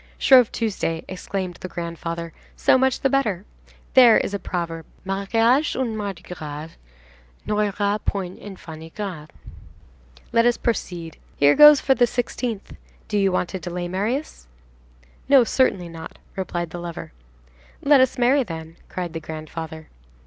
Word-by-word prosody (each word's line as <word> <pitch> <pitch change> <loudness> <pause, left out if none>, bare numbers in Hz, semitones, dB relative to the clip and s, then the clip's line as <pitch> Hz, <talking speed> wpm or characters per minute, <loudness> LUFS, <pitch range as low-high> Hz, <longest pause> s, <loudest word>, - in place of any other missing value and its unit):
"Shrove 255 -4 +6
Tuesday!" 195 -7 -2
exclaimed 185 -1 -5
the - - -4
grandfather, 170 -1 -5 0.2
"so - - +4
much 265 0 +2
the - - +3
better. 215 -9 0 0.5
There 245 -4 +8
is - - -1
a 200 - -2
proverb: 170 -3 -4 0.2
"'Mariage 225 +9 +2
un 245 -4 -1
Mardi 200 -5 -5
gras 155 -2 -7 0.8
N'aura 205 0 0
point 190 -2 -3
enfants 175 -6 -10
ingrats.'66 165 -2 -7 1.0
Let 230 +1 +4
us 240 - +2
proceed. 175 -8 -3 0.2
Here 145 0 +5
goes 295 -1 +9
for 270 - +3
the 250 -2 +4
16th! 240 -2 -3 0.3
Do 210 -2 0
you 195 -1 +3
want 180 -1 0
to 190 - -5
delay, 175 +1 -4
Marius?" 210 - -3 0.8
"No, 275 -3 +7
certainly 215 -7 +1
not!" 165 -1 -10 0.2
replied 175 -3 -3
the 175 - -6
lover. 170 - -7 0.7
"Let 280 -2 +6
us 260 - +2
marry, 255 +3 +4
then," 165 -6 -7
cried 175 -3 -4
the 165 - -4
grandfather. 160 0 -7
190 Hz, 140 wpm, -23 LUFS, 170-235 Hz, 1.0 s, goes